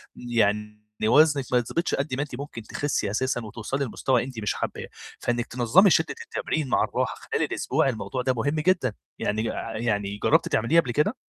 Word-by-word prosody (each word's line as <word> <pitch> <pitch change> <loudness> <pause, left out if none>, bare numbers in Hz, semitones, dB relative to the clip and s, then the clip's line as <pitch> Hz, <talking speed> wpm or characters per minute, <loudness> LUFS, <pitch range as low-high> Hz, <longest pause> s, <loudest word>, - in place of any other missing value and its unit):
يعني 105 -3 0 0.2
وزنِك 145 +2 +5
ما - - +6
يتضبطش 165 +9 0
قد 140 0 -2
ما 135 - -1
أنتِ 145 - -7
ممكن 140 -5 -6
تخسّي 110 -3 -2
أساسًا 125 +3 0
وتوصلي 115 +6 -3
لمستوى 125 +1 +1
أنتِ 130 -3 -7
مش 105 - -1
حاباه، - - -4 0.3
فإنِّك 120 -1 -1
تنظّمي 130 - +4
شدة 160 0 +2
التمرين 155 -4 -2
مع - - +3
الراحة - - -2
خلال - - -2
الأسبوع - - 0
الموضوع 115 +1 -3
ده 130 +1 +1
مهم 140 +5 -1
جدًا، 160 - +2 0.3
يعني 110 +2 -1
ع 115 -1 -5
يعني 105 -3 -1
جرّبتِ - - +4
تعمليه 140 +10 +3
قبل 125 - -4
كده؟ 150 - +1
125 Hz, 180 wpm, -25 LUFS, 110-145 Hz, 0.3 s, ما